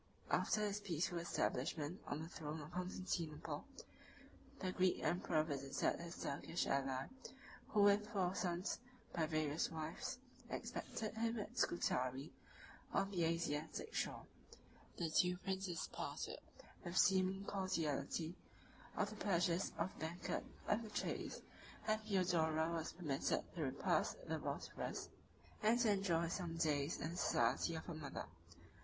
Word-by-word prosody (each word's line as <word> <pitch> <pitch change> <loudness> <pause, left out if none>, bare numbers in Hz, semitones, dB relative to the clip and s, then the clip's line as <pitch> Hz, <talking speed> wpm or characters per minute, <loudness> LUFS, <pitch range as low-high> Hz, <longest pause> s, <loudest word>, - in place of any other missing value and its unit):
After 215 - +3
his 210 -1 +1
peaceful 175 -3 0
establishment 155 0 0
on 150 +2 -2
the - - -5
throne 155 -2 -4
of 150 +1 -8
Constantinople, 180 -3 -2 0.9
the 185 - -1
Greek 185 0 +3
emperor 170 -3 +3
visited 140 -3 0
his 170 0 -6
Turkish 145 +4 -1
ally, 135 -1 +1 0.6
who 210 -2 +4
with 205 +1 +6
four 190 -5 +1
sons, 180 0 0 0.3
by 160 -2 +2
various 155 -1 +1
wives, 165 +11 -3 0.3
expected 215 -2 -3
him 225 +1 0
at 215 +3 -4
Scutari, 130 - +1 0.6
on 195 - +2
the 175 -4 +2
Asiatic 165 - -1
shore. - - -1 0.7
The 165 -2 0
two 180 +2 +4
princes 190 -2 -2
partook, - - -3 0.4
with 175 +1 -3
seeming 190 +1 +5
cordiality, 165 -4 0 0.6
of 205 0 +2
the - - -6
pleasures 175 -3 +2
of 180 +3 0
the - - -14
banquet 165 +3 -2 0.2
and 210 - +3
the 220 - -6
chase; - - -2 0.5
and 215 0 +3
Theodora 170 -6 +3
was 165 -1 -1
permitted 150 -6 0
to - - -3
repass - - +2
the - - 0
Bosphorus, - - -3 0.5
and 225 +3 +5
to 225 -3 +5
enjoy 175 -4 +3
some 170 -2 -2
days 150 -2 +2
in 155 - -2
the 175 - -5
society 170 - +3
of 160 - -4
her 170 - -4
mother. 155 -3 -4
170 Hz, 135 wpm, -41 LUFS, 155-195 Hz, 0.9 s, with